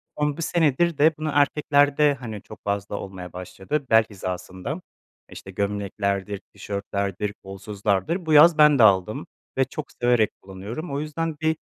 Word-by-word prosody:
Ama 150 Hz, 0 st, -1 dB
1 -, -, -5 dB
senedir 165 Hz, 0 st, +1 dB
de 155 Hz, +3 st, +5 dB
bunu 155 Hz, -1 st, -2 dB
erkeklerde, 145 Hz, 0 st, +3 dB
hani, 115 Hz, -6 st, -7 dB
çok -, -, -13 dB
fazla 100 Hz, 0 st, -2 dB
olmaya 90 Hz, -3 st, -8 dB
başladı 95 Hz, +11 st, -4 dB
bel 110 Hz, 0 st, +6 dB
hizasında. 95 Hz, -, -5 dB, 0.5 s
İşte, 95 Hz, -, -10 dB
gömleklerdir, 100 Hz, 0 st, -2 dB
tişörtlerdir, 100 Hz, 0 st, -3 dB
kolsuzlardır. 100 Hz, -, -2 dB
Bu 160 Hz, -, +1 dB
yaz 155 Hz, +2 st, +8 dB
ben 150 Hz, -3 st, +6 dB
de -, -, +7 dB
aldım 95 Hz, -4 st, +3 dB, 0.3 s
ve 135 Hz, -, +3 dB
çok 150 Hz, +2 st, -7 dB
severek 120 Hz, -3 st, +2 dB
kullanıyorum. 100 Hz, -, -7 dB
O 140 Hz, -, -1 dB
yüzden 155 Hz, +1 st, -3 dB
bir 160 Hz, 0 st, +2 dB
110 Hz, 150 wpm, -24 LUFS, 100-150 Hz, 0.5 s, yaz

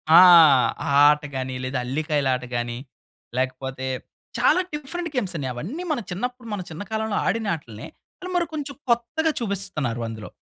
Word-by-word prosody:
ఆ! -, -, +11 dB, 0.7 s
ఆ -, -, 0 dB, 0.2 s
ఆట 150 Hz, 0 st, -1 dB
గాని 130 Hz, 0 st, -3 dB
లేదా 130 Hz, 0 st, -2 dB
అల్లికాయలు 145 Hz, +1 st, 0 dB
ఆట 125 Hz, -, -6 dB
గాని 120 Hz, 0 st, -2 dB, 0.6 s
లేకపోతే 130 Hz, 0 st, -2 dB, 0.5 s
చాలా 300 Hz, +9 st, +4 dB
డిఫరెంట్ 335 Hz, +4 st, -4 dB
గేమ్సన్ని. 180 Hz, -, -1 dB
అవన్నీ 200 Hz, -, -5 dB
మన 295 Hz, -, 0 dB
చిన్నప్పుడు 245 Hz, +5 st, -4 dB
మన 205 Hz, -, -3 dB
చిన్న 160 Hz, +5 st, -6 dB
కాలంలో 220 Hz, -1 st, -1 dB
ఆడిన 225 Hz, -2 st, 0 dB
ఆటల్నే. 115 Hz, -9 st, -10 dB, 0.5 s
మరి 345 Hz, -1 st, +2 dB
కొంచెం 285 Hz, -2 st, -5 dB
కొత్తగా 240 Hz, +8 st, +1 dB
చూపిస్తున్నారు 195 Hz, -, -2 dB
అందులో. 110 Hz, -2 st, -7 dB
180 Hz, 145 wpm, -24 LUFS, -, 0.7 s, ఆ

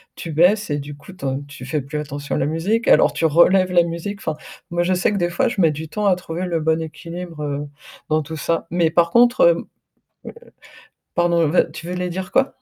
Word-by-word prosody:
tu 165 Hz, -, -7 dB
baisses 180 Hz, +7 st, +3 dB
et 145 Hz, -, 0 dB
du 145 Hz, +1 st, -8 dB
coup, 145 Hz, +5 st, -14 dB
tu 180 Hz, -7 st, -9 dB
en 135 Hz, +1 st, -1 dB
tu 145 Hz, -2 st, -11 dB
fais 145 Hz, +3 st, -2 dB
plus 150 Hz, +3 st, -5 dB
attention 145 Hz, -1 st, -5 dB
à -, -, 0 dB
la -, -, +1 dB
musique, 180 Hz, +10 st, -1 dB
alors -, -, +5 dB
tu -, -, -1 dB
relèves 180 Hz, +4 st, +4 dB
la 175 Hz, -1 st, +5 dB
musique, 170 Hz, +4 st, -5 dB
enfin, 155 Hz, -, -1 dB, 0.3 s
moi, 175 Hz, 0 st, 0 dB
je 185 Hz, -, +1 dB
sais 180 Hz, +2 st, +1 dB
que 205 Hz, -, -1 dB
des 175 Hz, -2 st, 0 dB
fois, 175 Hz, +7 st, +1 dB
je 225 Hz, -, -5 dB
mets 165 Hz, -4 st, +4 dB
du 155 Hz, +1 st, -7 dB
temps 210 Hz, +5 st, -3 dB
à 190 Hz, -, +4 dB
trouver 180 Hz, 0 st, -5 dB
le 170 Hz, -3 st, -1 dB
bon 160 Hz, +1 st, +1 dB
équilibre, 165 Hz, 0 st, -7 dB
heu, 145 Hz, 0 st, -3 dB, 0.4 s
dans 155 Hz, 0 st, +1 dB
tout 160 Hz, +2 st, -7 dB
ça. 165 Hz, +2 st, -1 dB
Mais 170 Hz, -2 st, +2 dB
par 170 Hz, 0 st, +3 dB
contre, 240 Hz, -, +4 dB
heu -, -, +6 dB
heu, -, -, -9 dB, 1.5 s
pardon, 170 Hz, -1 st, +2 dB
veux 165 Hz, +5 st, +2 dB
tu 170 Hz, -, -9 dB
voulais 180 Hz, 0 st, -2 dB
dire 185 Hz, +1 st, -5 dB
quoi? 270 Hz, 0 st, 0 dB
170 Hz, 240 wpm, -21 LUFS, 155-180 Hz, 1.5 s, heu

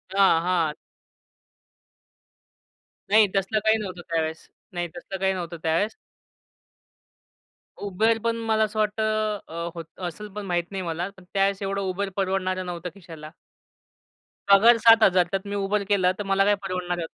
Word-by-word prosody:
हां, 190 Hz, -5 st, +5 dB
हां. 170 Hz, -4 st, +1 dB, 2.4 s
नाही 215 Hz, 0 st, +6 dB
तसलं 195 Hz, +3 st, +1 dB
काही 220 Hz, 0 st, +4 dB
नव्हतं 185 Hz, -4 st, -6 dB
त्यावेळेस 160 Hz, -1 st, -2 dB, 0.3 s
नाही 175 Hz, 0 st, -2 dB
तसलं 190 Hz, +2 st, -7 dB
काही 190 Hz, 0 st, +1 dB
नव्हतं 170 Hz, -2 st, -5 dB
त्यावेळेस. 165 Hz, +7 st, 0 dB, 1.8 s
Uber 215 Hz, +3 st, +1 dB
पण 230 Hz, 0 st, +1 dB
मला 220 Hz, -1 st, +2 dB
असं 215 Hz, 0 st, -2 dB
वाटत 210 Hz, 0 st, 0 dB
अ, 210 Hz, -6 st, -2 dB
होत 165 Hz, -2 st, -6 dB, 0.2 s
असेल 210 Hz, +5 st, -7 dB
पण 210 Hz, -, -5 dB
माहित 175 Hz, -2 st, 0 dB
नाही 195 Hz, -1 st, -3 dB
मला. 170 Hz, +2 st, -3 dB
पण 190 Hz, -, -15 dB
त्यावेळेस 195 Hz, 0 st, +1 dB
एवढं 195 Hz, -1 st, -2 dB
Uber 200 Hz, +2 st, -3 dB
परवडणारं 185 Hz, -1 st, -1 dB
नव्हतं 175 Hz, 0 st, -5 dB
खिशाला. 165 Hz, -5 st, -11 dB, 1.2 s
पगार 215 Hz, +4 st, +7 dB
7000. 215 Hz, -6 st, +6 dB
त्यात 195 Hz, +1 st, -2 dB
मी 200 Hz, -, -4 dB
Uber 200 Hz, +1 st, 0 dB
केलं 185 Hz, -3 st, +3 dB
तर -, -, -2 dB
मला 195 Hz, 0 st, +2 dB
काय 205 Hz, 0 st, +4 dB
परवडणार 180 Hz, -2 st, -3 dB
होत? 165 Hz, -, -4 dB
195 Hz, 145 wpm, -25 LUFS, 175-205 Hz, 2.4 s, पगार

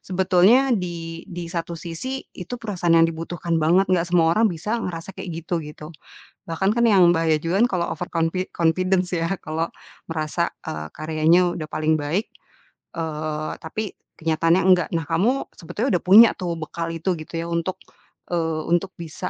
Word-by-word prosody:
sebetulnya 190 Hz, +8 st, +3 dB
di 170 Hz, -5 st, -3 dB
di 175 Hz, -2 st, -6 dB
satu 170 Hz, -1 st, -3 dB
sisi 180 Hz, +12 st, -5 dB
itu 195 Hz, +7 st, -7 dB
perasaan 180 Hz, -7 st, +1 dB
yang 165 Hz, -, +6 dB
dibutuhkan 165 Hz, 0 st, -2 dB
banget, 170 Hz, +5 st, +4 dB
enggak 175 Hz, -1 st, +1 dB
semua 165 Hz, -2 st, +4 dB
orang 220 Hz, +4 st, +3 dB
bisa 210 Hz, +7 st, -3 dB
ngerasa 175 Hz, -1 st, -5 dB
kayak -, -, -8 dB, 0.2 s
gitu, 170 Hz, -1 st, -1 dB
gitu. 150 Hz, +1 st, -10 dB, 0.5 s
Bahkan 190 Hz, +6 st, 0 dB
kan 235 Hz, -, +3 dB
yang 195 Hz, -6 st, +6 dB
bahaya 160 Hz, -2 st, +2 dB
juga 165 Hz, +4 st, -1 dB
kan -, -, +2 dB
kalau 175 Hz, -2 st, 0 dB
over 180 Hz, -, -4 dB
confi 165 Hz, +2 st, 0 dB
confidence 180 Hz, +2 st, +1 dB
ya 165 Hz, +2 st, -1 dB
kalau 160 Hz, +1 st, -3 dB, 0.4 s
merasa 160 Hz, +2 st, -1 dB, 0.2 s
eee, 75 Hz, 0 st, -5 dB
karyanya 160 Hz, +3 st, +2 dB
udah 155 Hz, -2 st, -5 dB
paling 155 Hz, +1 st, +1 dB
baik, 165 Hz, +9 st, -1 dB, 0.7 s
eee, 155 Hz, -2 st, -3 dB
tapi 205 Hz, +6 st, -5 dB, 0.3 s
kenyataannya 165 Hz, +2 st, +2 dB
enggak. 180 Hz, -2 st, +4 dB
Nah, 165 Hz, -, -3 dB
kamu 215 Hz, +12 st, +1 dB
sebetulnya 215 Hz, -, -3 dB
udah -, -, -9 dB
punya 215 Hz, +5 st, +9 dB
tuh 175 Hz, -2 st, -2 dB
bekal 165 Hz, +1 st, -4 dB
itu 165 Hz, +3 st, -1 dB
gitu 155 Hz, +1 st, -11 dB
ya, -, -, -5 dB
untuk, 170 Hz, +2 st, -2 dB, 0.6 s
eee, 160 Hz, -2 st, 0 dB
untuk 175 Hz, +2 st, +1 dB
bisa 165 Hz, -3 st, -6 dB
170 Hz, 170 wpm, -23 LUFS, 165-185 Hz, 0.7 s, punya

